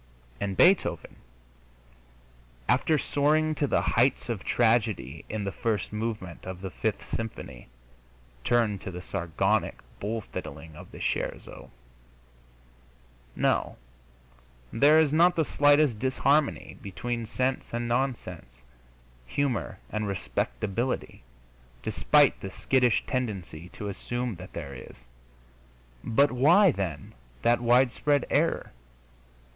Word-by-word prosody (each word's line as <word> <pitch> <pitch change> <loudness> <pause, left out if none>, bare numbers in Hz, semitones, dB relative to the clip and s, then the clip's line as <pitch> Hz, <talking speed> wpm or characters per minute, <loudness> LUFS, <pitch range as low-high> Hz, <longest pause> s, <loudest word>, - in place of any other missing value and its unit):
And 100 -1 -3
Beethoven, 175 - +3 1.5
after 135 +7 +3
soaring 155 +3 +1
to 145 -1 0
the - - +1
heights 125 +2 +2
of 110 -6 -3
tragedy 110 - +1
in 110 -1 -3
the 100 - -2
first 105 0 -2
movement 105 -5 -4
of 95 -1 -7
the 95 -1 -5
Fifth 110 +2 -2
Symphony, 115 0 -6 0.8
turned 110 - +1
to - - -6
the 90 0 -7
sardonic 95 +6 0 0.2
bull 110 +2 -2
fiddling 80 -5 -8
of - - -11
the - - -11
scherzo. - - -4 1.7
No, - - 0 1.0
there 145 +6 +6
is 155 -2 +4
not 175 +3 +5
the 160 - +2
slightest 145 -6 +3
disharmony 140 +3 +1
between 115 +4 -4
sense 130 +3 -2
and 120 0 -2
nonsense, 110 - -3 0.6
humor 135 - -1
and 105 -1 -2
respectability, 95 - -3 0.6
despite - - +3
the - - -5
skittish 125 -4 +2
tendency 95 -9 -4
to 105 - -6
assume 120 +4 -3
that 90 +2 -11
there 75 -5 -6
is. 65 - -10 1.1
But, 140 +6 +3
why, 165 +10 +5
then, 90 - -4 0.3
that 120 0 +3
widespread 130 +3 +3
error? - - +1
115 Hz, 110 wpm, -27 LUFS, 95-135 Hz, 1.7 s, there